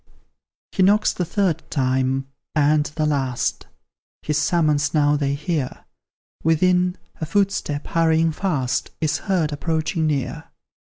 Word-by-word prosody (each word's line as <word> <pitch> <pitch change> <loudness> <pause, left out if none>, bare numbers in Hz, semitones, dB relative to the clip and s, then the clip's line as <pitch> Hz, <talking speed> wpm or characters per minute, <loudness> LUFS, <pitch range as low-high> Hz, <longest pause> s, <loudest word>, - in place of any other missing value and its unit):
He - - -1
knocks 205 +3 +4
the 180 - -2
third 175 -3 0
time, 130 -1 0 0.3
and 150 0 +3
the 155 +1 -2
last 135 -5 -1 0.6
His 150 0 0
summons 155 -1 +1
now 145 -1 +4
they 140 -1 0
hear, 150 -3 -3 0.6
Within, 180 +3 +2 0.2
a 160 - -3
footstep, 195 -7 0
hurrying 165 -1 +2
fast, 150 -7 -1
Is 155 -1 0
heard 175 -7 0
approaching 160 +1 -1
near. 140 -4 -2
155 Hz, 120 wpm, -22 LUFS, 145-170 Hz, 0.6 s, knocks